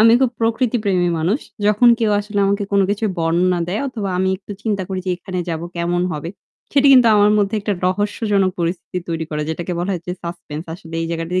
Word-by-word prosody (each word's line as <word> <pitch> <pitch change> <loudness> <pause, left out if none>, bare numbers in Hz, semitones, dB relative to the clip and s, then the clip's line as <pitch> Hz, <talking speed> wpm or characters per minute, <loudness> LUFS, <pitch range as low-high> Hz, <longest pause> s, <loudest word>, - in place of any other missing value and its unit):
আমি 225 +1 +7
খুব 260 -3 +3
প্রকৃতি 230 +2 +1
প্রেমী 180 -3 +2
মানুষ। 185 - 0 0.3
যখন 210 +4 +5
কেউ 225 -3 +1
আসলে 205 0 -4
আমাকে 200 +1 0
কোন 200 - +4
কিছুর 210 +1 0
বর্ণনা 175 +2 +2
দেয় 190 +4 -1
অথবা 220 -6 -4
আমি 190 +1 +2
একটু 200 +1 -9
চিন্তা 205 -4 -1
করি 190 -1 -3
যে - - +1
এখানে 185 0 -6
যাবো, 165 0 -3
কেমন 175 +1 0
হবে? 155 +3 -5 0.4
সেটি 280 0 +5
কিন্তু 250 -3 +7
আমার 205 0 +5
মধ্যে 205 +1 +1
একটা 205 +1 -1
রহস্যজনক 205 0 +1
পরিস্থিতি 170 +1 -2
তৈরি 165 -1 -2
করে। 150 0 -2
যেটাকে 175 +3 -4
বলা 175 +3 -1
হয় 180 - -3
যে 180 - -2
suspense 170 -2 -6
আসলে 165 -1 -11
এই - - -2
জায়গাটিতে 165 +2 -1
190 Hz, 210 wpm, -19 LUFS, 170-210 Hz, 0.4 s, আমি